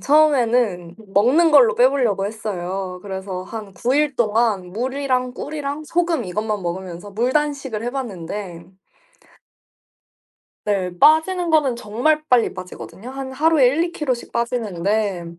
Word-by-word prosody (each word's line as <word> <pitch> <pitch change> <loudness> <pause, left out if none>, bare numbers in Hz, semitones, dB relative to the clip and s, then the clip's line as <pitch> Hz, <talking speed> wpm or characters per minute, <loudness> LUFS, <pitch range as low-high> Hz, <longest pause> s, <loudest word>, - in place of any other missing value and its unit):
처음에는 245 - +2 0.2
먹는 280 +11 +4
걸로 265 -7 +6
빼 250 +1 +6
보려고 235 -8 0
했어요. 190 -3 -4
그래서 190 -2 -5
한 205 0 -8
9 245 +7 0
일 295 -2 +1
동안 215 -5 +1
물이랑 255 +2 -1
꿀이랑 290 +1 -5
소금 335 +1 0
이것만 210 +2 -3
먹으면서 180 +2 -5
물 235 +5 0
단식을 280 -7 -1
해봤는데 200 -8 -5 2.0
네. 195 -3 0
빠지는 335 +4 +4
거는 300 -6 +3
정말 245 +8 0
빨리 245 -2 +3
빠지거든요. 185 +5 -9
한 270 0 -6
하루에 290 -1 +4
1-2kg 305 -1 -1
씩 240 - -9
빠지는데 210 -5 -1
235 Hz, 275 characters per minute, -21 LUFS, 195-280 Hz, 2.0 s, 걸로